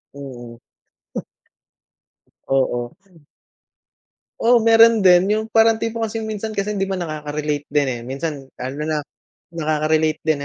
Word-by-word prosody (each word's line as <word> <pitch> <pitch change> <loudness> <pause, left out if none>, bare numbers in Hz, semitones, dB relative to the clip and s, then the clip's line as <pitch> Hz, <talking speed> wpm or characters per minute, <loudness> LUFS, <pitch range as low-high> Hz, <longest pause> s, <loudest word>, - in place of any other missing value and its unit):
Mm. 120 -4 -9 1.9
Oo. 120 -3 0 1.5
Oo, 235 0 +4
meron 225 -1 +6
din. 185 +2 +5
Yung 220 0 0
parang 225 0 +4
tipo 230 0 -2
kasi 225 0 -3
minsan 220 0 -4
kasi 200 +1 -2
hindi 195 - 0
ba, 195 - -3
nakakarelate 150 -3 -3
din, 145 -2 +2
eh. 120 -2 -3
Minsan 140 +1 -4 0.2
ano 130 +3 -5
na, 155 -1 -1 0.5
nakaka-relate 155 -1 0
din, 155 -2 +1
160 Hz, 120 wpm, -20 LUFS, 145-220 Hz, 1.9 s, meron